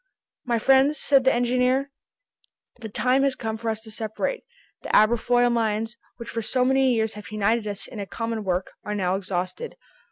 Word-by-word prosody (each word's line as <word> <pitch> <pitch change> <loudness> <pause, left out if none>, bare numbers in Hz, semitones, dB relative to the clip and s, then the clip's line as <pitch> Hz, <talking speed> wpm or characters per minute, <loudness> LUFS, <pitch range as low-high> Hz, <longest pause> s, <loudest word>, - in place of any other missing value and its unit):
"My 240 -2 +1
friends," 270 +5 +4
said 275 -2 +3
the 265 - +6
engineer, 250 +3 +1 0.9
"the 225 -2 -7
time 255 +5 +2
has 275 -1 +2
come 220 -3 -4
for 225 +1 -3
us 220 0 -3
to 220 -1 -11
separate. 220 - -3 0.4
The - - -8
Aberfoyle 240 +2 +4
mines, 225 0 -1 0.2
which 235 - -8
for 230 - -2
so 250 +3 +1
many 265 0 +3
years 220 -2 0
have 210 0 -10
united 215 +2 0
us 200 -1 -4
in 225 - -9
a 200 - -5
common 225 +1 -3
work, 185 -1 -1
are 210 - -3
now 185 -2 0
exhausted. 190 - -4
230 Hz, 185 wpm, -24 LUFS, 215-255 Hz, 0.9 s, the